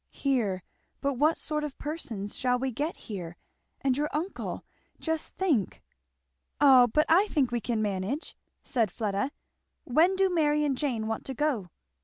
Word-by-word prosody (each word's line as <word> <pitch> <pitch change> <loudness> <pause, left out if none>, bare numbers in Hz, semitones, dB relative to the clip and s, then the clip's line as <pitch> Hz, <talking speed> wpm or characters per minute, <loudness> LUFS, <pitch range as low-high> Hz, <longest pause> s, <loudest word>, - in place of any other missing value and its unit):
"Here! 220 -10 0 0.4
But 275 -3 -1
what 310 +3 +4
sort 300 -1 -2
of 295 -3 -5
persons 230 -10 -5
shall 250 -1 +1
we 260 +1 -1
get 295 +8 -2
here? 175 -6 -7 0.4
And 265 -2 +2
your 295 +2 0
uncle 335 +6 -3 0.3
just 320 -1 -3
think!" 295 - 0 0.8
"O 265 -4 +8
but 305 +7 +2
I 370 +6 +5
think 280 -10 +1
we 240 -1 -1
can 220 0 -1
manage," 205 - -2 0.3
said 230 -6 +1
Fleda. 205 +4 -1 0.5
"When 330 +9 +4
do 385 0 +3
Mary 300 -4 +2
and 280 -2 +1
Jane 250 -5 -1
want 225 0 -2
to 265 - -5
go?" 250 -10 0
265 Hz, 160 wpm, -28 LUFS, 225-300 Hz, 0.8 s, O